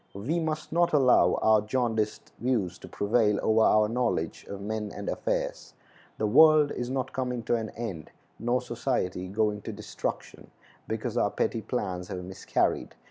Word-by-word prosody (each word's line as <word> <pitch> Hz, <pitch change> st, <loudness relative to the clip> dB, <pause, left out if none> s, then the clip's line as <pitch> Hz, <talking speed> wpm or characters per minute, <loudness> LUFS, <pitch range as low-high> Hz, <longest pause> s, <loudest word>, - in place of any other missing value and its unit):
We 135 Hz, +13 st, -1 dB
must 155 Hz, -1 st, -3 dB
not 170 Hz, +1 st, +2 dB
allow 135 Hz, -4 st, +5 dB
our 110 Hz, -1 st, +5 dB
jaundiced 110 Hz, -1 st, -1 dB
views 110 Hz, -8 st, -1 dB
to -, -, -10 dB
prevail 105 Hz, 0 st, +1 dB
over 110 Hz, 0 st, +3 dB
our 105 Hz, -1 st, +5 dB
knowledge 120 Hz, +2 st, -1 dB
of 100 Hz, -, -6 dB
men 105 Hz, +1 st, -4 dB
and 100 Hz, -, -7 dB
affairs. -, -, -2 dB, 0.4 s
The 110 Hz, -, 0 dB
world 155 Hz, +6 st, +6 dB
is 120 Hz, 0 st, -4 dB
not 130 Hz, 0 st, -2 dB
coming 125 Hz, -2 st, -2 dB
to 120 Hz, -, +1 dB
an 110 Hz, -2 st, -3 dB
end, 100 Hz, -10 st, -5 dB, 0.3 s
nor 120 Hz, +2 st, 0 dB
society 115 Hz, -7 st, -2 dB
going 105 Hz, +1 st, 0 dB
to 110 Hz, -, -6 dB
destruction, 105 Hz, 0 st, -6 dB, 0.4 s
because -, -, -3 dB
our -, -, +3 dB
petty 115 Hz, -, -1 dB
plans 95 Hz, -7 st, -3 dB
have 90 Hz, 0 st, -5 dB
miscarried. 95 Hz, +1 st, -1 dB
110 Hz, 160 wpm, -28 LUFS, 105-125 Hz, 0.4 s, world